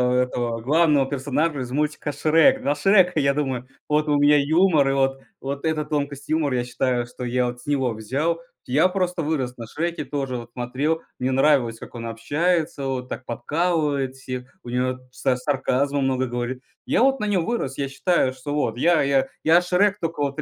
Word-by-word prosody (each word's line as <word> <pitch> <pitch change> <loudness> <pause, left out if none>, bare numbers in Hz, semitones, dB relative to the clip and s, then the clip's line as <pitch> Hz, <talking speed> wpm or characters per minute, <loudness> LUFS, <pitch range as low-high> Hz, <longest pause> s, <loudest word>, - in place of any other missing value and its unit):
этого 120 -2 0
главного 145 +2 +3
персонажа 145 +2 -1
из 125 -1 -6
мультика 150 +1 -1
"Шрек". 165 - +4
На 145 - 0
Шрека, 180 0 +4
я 140 0 +3
думаю, 130 -4 -2 0.2
вот 150 0 +1
у 145 - +3
меня 145 +1 +5
юмор, 155 -1 +3
и - - +1
вот 135 0 +1 0.2
вот 140 +2 -5
эта 155 -1 0
тонкость 145 -2 -3
юмора 150 -4 +1
я 120 - -1
считаю, 125 0 -1
что 125 +1 -9
я 125 +1 0
вот 120 0 -5
с - - -17
него 135 -5 +1
взял. 140 +10 -2 0.3
Я 145 +8 +4
просто 180 -2 -1
вырос 140 -5 -2
на 115 -2 -7
Шреке, 170 +6 -3
тоже 135 -3 -3
вот 120 0 -9
смотрел, 135 +7 -1 0.2
мне 125 - 0
нравилось, 130 -4 +3
как - - -11
он 115 -1 -6
общается, 145 +6 -1
вот 125 -1 -3
так - - -5
подкалывает 145 +1 -1
всех, 130 0 -7
у 120 - -9
него 125 +1 0
са 125 0 0
сарказма 140 +1 0
много 130 -1 +1
говорит. 120 +1 -4 0.2
Я - - +3
вот 270 0 +3
на 210 - -1
нём 185 -5 +1
вырос. 180 - -2
Я 140 -1 -1
считаю, 140 -2 +1
что 145 +2 -6
вот 120 -6 -1
я 170 +4 +4
я 135 -1 +2 0.2
я 165 +3 +5
Шрек 190 +3 +2
тока 165 -4 -2
вот 140 0 -2
в - - 0
140 Hz, 195 wpm, -23 LUFS, 125-160 Hz, 0.3 s, меня